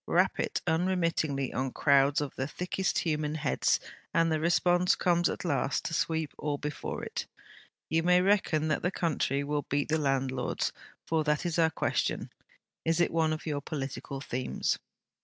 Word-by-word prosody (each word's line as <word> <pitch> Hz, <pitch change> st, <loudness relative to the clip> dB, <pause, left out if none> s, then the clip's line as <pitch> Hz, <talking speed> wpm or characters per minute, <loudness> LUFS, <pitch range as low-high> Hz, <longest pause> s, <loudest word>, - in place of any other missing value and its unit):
'Rap -, -, +2 dB
it -, -, -1 dB
unremittingly 165 Hz, -5 st, 0 dB
on 130 Hz, +2 st, -1 dB
crowds 140 Hz, +1 st, +4 dB
of 145 Hz, -, -3 dB
the 130 Hz, -, -2 dB
thickest 180 Hz, +4 st, -2 dB
of -, -, +1 dB
human 150 Hz, -2 st, -1 dB
heads, 150 Hz, -3 st, +1 dB, 0.4 s
and 165 Hz, -1 st, +3 dB
the 155 Hz, -, +1 dB
response 175 Hz, +2 st, +3 dB
comes 175 Hz, -1 st, +2 dB
at -, -, -4 dB
last 140 Hz, -4 st, 0 dB
to -, -, -3 dB
sweep 160 Hz, -1 st, 0 dB
all 145 Hz, -1 st, -1 dB
before 150 Hz, +1 st, -4 dB
it. -, -, -4 dB, 0.6 s
You 165 Hz, +1 st, +2 dB
may 180 Hz, +1 st, +5 dB
reckon 180 Hz, -5 st, +2 dB
that 150 Hz, -, +1 dB
the 180 Hz, -, +1 dB
country 150 Hz, -6 st, 0 dB
will 145 Hz, 0 st, -2 dB
beat 145 Hz, +1 st, 0 dB
the 160 Hz, +1 st, +2 dB
landlords 135 Hz, -3 st, 0 dB, 0.3 s
for 160 Hz, -1 st, +1 dB
that 150 Hz, +2 st, +1 dB
is 170 Hz, -1 st, 0 dB
our 160 Hz, -1 st, +5 dB
question. -, -, -1 dB, 0.5 s
Is 165 Hz, +1 st, +1 dB
it 175 Hz, -, +3 dB
one 160 Hz, -1 st, +2 dB
of 155 Hz, +1 st, -4 dB
your 145 Hz, -3 st, -2 dB
political 135 Hz, -1 st, -5 dB
themes?' 130 Hz, -2 st, -1 dB
155 Hz, 175 wpm, -30 LUFS, 140-170 Hz, 0.6 s, may